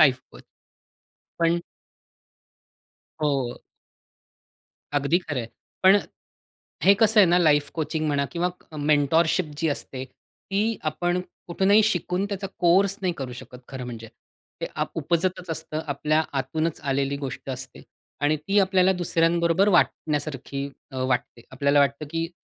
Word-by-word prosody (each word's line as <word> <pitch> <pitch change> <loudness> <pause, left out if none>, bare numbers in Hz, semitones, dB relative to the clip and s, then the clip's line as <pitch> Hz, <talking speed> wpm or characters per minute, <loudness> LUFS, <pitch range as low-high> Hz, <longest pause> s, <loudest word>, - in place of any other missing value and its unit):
Life 130 -4 +5
coach. - - -13 1.0
पण 170 0 +3 1.6
हो. 135 -5 0 1.4
अगदी 145 +5 +2
खरं 150 -7 -4
आहे. 115 - -6 0.4
पण 190 +1 +8 0.9
हे 195 - +7
कसं 220 -1 +6
आहे 190 - +7
ना, 175 - +5
लाईफ 150 -4 +3
कोचिंग 155 -1 -2
म्हणा 140 -1 +1
किंवा 175 +1 0 0.3
मेंटरशिप 155 +4 +2
जी 165 0 +1
असते, 130 -2 -3
ती 205 - -4
आपण 175 +3 -1 0.3
कुठूनही 195 +5 +4
शिकून 180 -1 0
त्याचा 200 -1 -4
कोर्स 190 +3 +4
नाही 180 -2 +1
करू 130 -2 -5
शकत. 125 0 -10
खरं 130 -2 -6
म्हणजे. 115 -2 -8 0.5
ते - - -2
अप - - -1
उपजतच 175 +3 -1
असतं. 155 -1 -3
आपल्या 150 +2 +1 0.2
आतूनच 160 +3 -2
आलेली 140 0 -1
गोष्ट 135 +1 -6
असते. 130 0 -7 0.4
आणि 145 +2 +2
ती 195 +7 0
आपल्याला 190 -1 +3
दुसऱ्यांबरोबर 170 +1 +2
वाटण्यासारखी 145 -5 0 0.2
अ, - - -7
वाटते. 125 -2 -2
आपल्याला 140 +2 +2
वाटतं 140 +1 +1
की 165 +1 -2
160 Hz, 130 wpm, -25 LUFS, 140-180 Hz, 1.6 s, पण